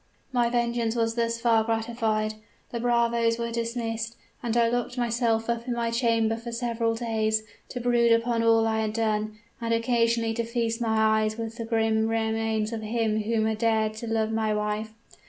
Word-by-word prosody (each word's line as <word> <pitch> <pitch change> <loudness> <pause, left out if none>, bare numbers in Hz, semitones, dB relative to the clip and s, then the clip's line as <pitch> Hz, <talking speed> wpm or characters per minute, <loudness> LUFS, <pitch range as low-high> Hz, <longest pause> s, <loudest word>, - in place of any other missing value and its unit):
"My 240 -1 +2
vengeance 235 -1 0
was 225 -1 +1
thus 230 0 -1
far 230 -2 +3
gratified 225 -1 -1 0.4
the 235 - -3
bravos 235 -1 +2
were 235 0 -3
dismissed, 230 -1 -3 0.3
and 240 -1 -1
I 235 -1 +4
locked 245 +1 -2
myself 235 -2 +1
up 235 +1 -2
in 245 - -1
my 235 -1 -1
chamber 230 -2 +2
for 235 +1 -7
several 230 -1 -1
days, 220 -2 0 0.3
to 250 - -5
brood 240 -1 +3
upon 230 0 +2
all 225 0 +4
I 220 0 +1
had 215 -1 -1
done, 215 -1 -1 0.2
and 230 0 -2
occasionally 230 -1 +1
to 235 +1 -1
feast 230 0 -2
my 220 -1 +3
eyes 215 0 -1
with 225 0 -5
the 230 - -4
grim 225 -1 +1
remains 220 -1 0
of 225 - -3
him 220 0 0
who 220 +1 0
had 220 -1 -1
dared 220 -1 +2
to 235 - -6
love 220 -1 0
my 220 -1 0
wife. 210 +1 -2
230 Hz, 185 wpm, -26 LUFS, 220-235 Hz, 0.4 s, I